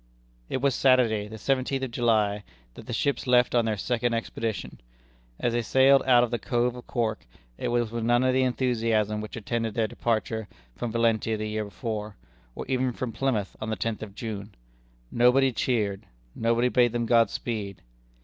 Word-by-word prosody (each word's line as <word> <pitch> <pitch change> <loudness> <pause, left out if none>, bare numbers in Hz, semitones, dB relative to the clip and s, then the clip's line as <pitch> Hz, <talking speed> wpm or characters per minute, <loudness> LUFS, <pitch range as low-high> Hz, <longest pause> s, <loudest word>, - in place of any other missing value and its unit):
It 130 - -2
was 140 -1 +3
Saturday, 120 -6 +3
the 110 +1 -9
seventeenth 135 +2 -1
of 130 - -3
July, 110 -4 +1 0.3
that - - -12
the - - -5
ships 140 -1 -1
left 125 -1 +4
on 120 -2 +3
their 110 -2 -1
second 120 +2 0
expedition. 115 - -4 0.6
As 120 - 0
they 120 - +1
sailed 135 +4 +5
out 120 -2 +6
of 120 - -2
the 120 - -1
Cove 120 +2 0
of 125 - -11
Cork, 115 - -2 0.3
it - - -2
was 120 -2 0
with 115 -1 -3
none 120 +2 +3
of 130 0 +2
the 130 - +3
enthusiasm 115 -4 0
which 110 - -7
attended 115 0 -3
their 115 -2 +2
departure 110 0 -2 0.3
from 120 - -4
Valentia 115 -1 +1
the 110 0 -3
year 105 0 -2
before, 105 -1 -5 0.4
or - - -5
even 130 -1 0
from 120 0 -4
Plymouth 115 -6 -1
on 110 - -3
the 110 - -1
tenth 110 +3 -3
of 100 -3 -8
June. 105 -3 -6 0.6
Nobody 125 +3 +4
cheered; 110 -5 -1 0.3
nobody 115 +2 +1
bade 120 -2 +3
them 120 -1 0
God 115 -2 +4
speed. 105 -5 -5
115 Hz, 185 wpm, -26 LUFS, 110-125 Hz, 0.6 s, out